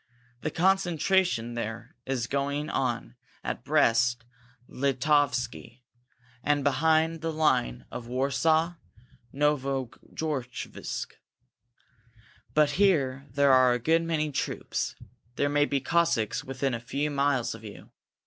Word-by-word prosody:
The -, -, -1 dB
concentration 175 Hz, -7 st, +1 dB
there 115 Hz, 0 st, -5 dB
is 130 Hz, -3 st, -1 dB
going 140 Hz, +3 st, -2 dB
on 120 Hz, -1 st, -2 dB, 0.3 s
at -, -, -4 dB
Brest 115 Hz, +1 st, +2 dB, 0.4 s
Litovsky, 130 Hz, -3 st, 0 dB, 0.6 s
and 145 Hz, -1 st, +1 dB
behind 160 Hz, +3 st, +2 dB
the 165 Hz, 0 st, -1 dB
line 150 Hz, -, +1 dB
of 120 Hz, -, -7 dB
Warsaw 140 Hz, +6 st, +1 dB, 0.6 s
Novo 135 Hz, -3 st, 0 dB, 0.2 s
Georgevsk. 135 Hz, -6 st, -4 dB, 1.5 s
But 150 Hz, -1 st, +4 dB
here 140 Hz, -8 st, +2 dB
there 140 Hz, +2 st, +3 dB
are 130 Hz, -1 st, +6 dB
a -, -, +1 dB
good 160 Hz, +7 st, +2 dB
many 155 Hz, -2 st, -1 dB
troops. -, -, -3 dB, 0.4 s
There 145 Hz, -, +1 dB
may 145 Hz, 0 st, +3 dB
be 140 Hz, -1 st, 0 dB
Cossacks 140 Hz, -6 st, +1 dB
within 135 Hz, 0 st, -2 dB
a 115 Hz, -, -2 dB
few 140 Hz, +6 st, -2 dB
miles 140 Hz, -3 st, +1 dB
of 115 Hz, 0 st, -11 dB
you. 105 Hz, -2 st, -11 dB
140 Hz, 115 wpm, -28 LUFS, 125-155 Hz, 1.5 s, are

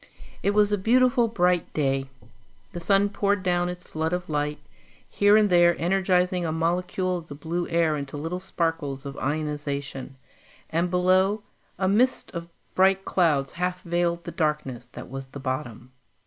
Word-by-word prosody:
It 200 Hz, +1 st, +1 dB
was 210 Hz, -1 st, +4 dB
a 205 Hz, -, +1 dB
beautiful 240 Hz, +3 st, +4 dB
bright 180 Hz, -5 st, +1 dB
day. 135 Hz, -2 st, 0 dB, 0.6 s
The 175 Hz, -, -6 dB
sun 195 Hz, +3 st, +3 dB
poured 200 Hz, -1 st, 0 dB
down 175 Hz, -1 st, +1 dB
its 180 Hz, 0 st, -7 dB
flood 160 Hz, +2 st, -3 dB
of 180 Hz, -1 st, -3 dB
light, 150 Hz, 0 st, -1 dB, 0.5 s
here 205 Hz, +1 st, +4 dB
and 215 Hz, -1 st, +4 dB
there 175 Hz, -2 st, +4 dB
energizing 180 Hz, 0 st, +2 dB
a 165 Hz, -, -1 dB
molecule 180 Hz, +3 st, 0 dB
of 165 Hz, -2 st, -9 dB
the 145 Hz, -, -8 dB
blue 170 Hz, +4 st, -3 dB
air 165 Hz, -2 st, +2 dB
into 140 Hz, 0 st, -5 dB
little 165 Hz, +5 st, -3 dB
sparkles 165 Hz, -6 st, -2 dB
of 140 Hz, 0 st, -6 dB
ionization; 145 Hz, -3 st, -3 dB, 0.6 s
and 170 Hz, +2 st, +1 dB
below, 185 Hz, +3 st, +2 dB, 0.3 s
a 190 Hz, -, 0 dB
mist 240 Hz, +7 st, +2 dB
of 170 Hz, -1 st, -6 dB, 0.2 s
bright 190 Hz, +1 st, +3 dB
clouds 150 Hz, -7 st, +2 dB
half 180 Hz, +1 st, -3 dB
veiled 170 Hz, 0 st, 0 dB
the 170 Hz, -, -6 dB
darkness 150 Hz, -7 st, -2 dB
that -, -, -10 dB
was 135 Hz, +1 st, -7 dB
the 140 Hz, -, -9 dB
bottom. 130 Hz, -2 st, -5 dB
175 Hz, 160 wpm, -25 LUFS, 150-185 Hz, 0.6 s, was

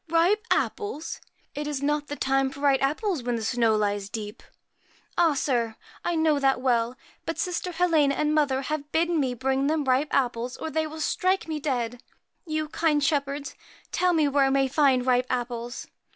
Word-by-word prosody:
* -, -, -34 dB
Ripe 350 Hz, +6 st, +3 dB
apples! 410 Hz, -7 st, -1 dB, 0.3 s
It 295 Hz, 0 st, -4 dB
is 285 Hz, -2 st, -3 dB
not 295 Hz, 0 st, 0 dB
the 290 Hz, -, -4 dB
time 270 Hz, -1 st, +1 dB
for 275 Hz, -, -11 dB
ripe 280 Hz, -2 st, +3 dB
apples, 310 Hz, -, 0 dB
when 245 Hz, 0 st, -1 dB
the 225 Hz, -, -3 dB
snow 230 Hz, -1 st, +2 dB
lies 205 Hz, -1 st, -1 dB
deep? 210 Hz, -1 st, -6 dB, 0.4 s
' -, -, -34 dB
'Ah, 330 Hz, -4 st, +4 dB
sir! 235 Hz, -5 st, 0 dB, 0.3 s
I 345 Hz, -, 0 dB
know 315 Hz, -2 st, +3 dB
that 270 Hz, -1 st, +2 dB
well; 240 Hz, -1 st, +1 dB, 0.3 s
but 330 Hz, -, -2 dB
sister 360 Hz, -1 st, -2 dB
Helena 320 Hz, -5 st, +3 dB
and 300 Hz, 0 st, +1 dB
mother 280 Hz, -3 st, +2 dB
have 295 Hz, +1 st, -4 dB
bidden 335 Hz, 0 st, +2 dB
me 260 Hz, -3 st, 0 dB
bring 265 Hz, +2 st, 0 dB
them 310 Hz, 0 st, +1 dB
ripe 265 Hz, +3 st, +2 dB
apples, 245 Hz, -1 st, 0 dB
or 320 Hz, -, -5 dB
they 315 Hz, 0 st, 0 dB
will 315 Hz, +1 st, -7 dB
strike 370 Hz, +4 st, +1 dB
me 310 Hz, -1 st, -3 dB
dead. 245 Hz, -4 st, -2 dB, 0.5 s
You, 310 Hz, 0 st, -1 dB
kind 305 Hz, -3 st, +1 dB
shepherds, 280 Hz, -1 st, -1 dB, 0.4 s
tell 360 Hz, -1 st, +2 dB
me 310 Hz, -3 st, +3 dB
where 280 Hz, -1 st, +3 dB
I -, -, +2 dB
may 270 Hz, 0 st, +2 dB
find 265 Hz, -2 st, +3 dB
ripe 250 Hz, 0 st, +2 dB
apples.' 240 Hz, 0 st, -3 dB
280 Hz, 195 wpm, -26 LUFS, 255-315 Hz, 0.5 s, Ah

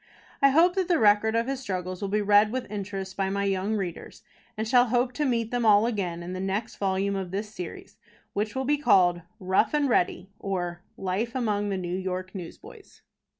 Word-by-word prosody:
I 275 Hz, -, +7 dB
hope 335 Hz, +6 st, +5 dB
that 375 Hz, -2 st, +1 dB
the 350 Hz, -3 st, +3 dB
record 215 Hz, 0 st, +4 dB
of 230 Hz, 0 st, +2 dB
his 270 Hz, 0 st, -3 dB
struggles 185 Hz, -6 st, -4 dB
will 200 Hz, -, -2 dB
be 210 Hz, +1 st, +1 dB
read 205 Hz, +1 st, +5 dB
with 255 Hz, -4 st, -4 dB
interest 195 Hz, -2 st, -5 dB
by 195 Hz, -1 st, -1 dB
my 200 Hz, +1 st, -1 dB
young 195 Hz, +2 st, 0 dB
readers, 185 Hz, -5 st, -5 dB, 0.3 s
and 220 Hz, +1 st, -2 dB
shall 245 Hz, +1 st, +5 dB
hope 245 Hz, +2 st, +1 dB
to 295 Hz, +4 st, -1 dB
meet 230 Hz, -4 st, 0 dB
them 245 Hz, -1 st, 0 dB
all 210 Hz, -1 st, +5 dB
again 185 Hz, -7 st, -2 dB
in 180 Hz, +1 st, -6 dB
the 185 Hz, -, -4 dB
next 195 Hz, +3 st, -3 dB
volume 195 Hz, 0 st, 0 dB
of 190 Hz, -2 st, -3 dB
this 205 Hz, +3 st, -4 dB
series, 180 Hz, -4 st, -8 dB, 0.4 s
which 210 Hz, +3 st, -2 dB
will 265 Hz, 0 st, -1 dB
be 295 Hz, +2 st, +2 dB
called: 175 Hz, -10 st, +4 dB, 0.2 s
ROUGH 190 Hz, +5 st, +1 dB
AND 290 Hz, -2 st, +2 dB
READY; 185 Hz, -3 st, 0 dB
OR, 175 Hz, -3 st, -3 dB, 0.2 s
LIFE 195 Hz, +6 st, -2 dB
AMONG 210 Hz, -5 st, 0 dB
THE 195 Hz, -, -1 dB
NEW 180 Hz, 0 st, -3 dB
YORK 185 Hz, 0 st, -4 dB
NEWSBOYS. 180 Hz, -4 st, -11 dB
205 Hz, 205 wpm, -26 LUFS, 190-230 Hz, 0.4 s, I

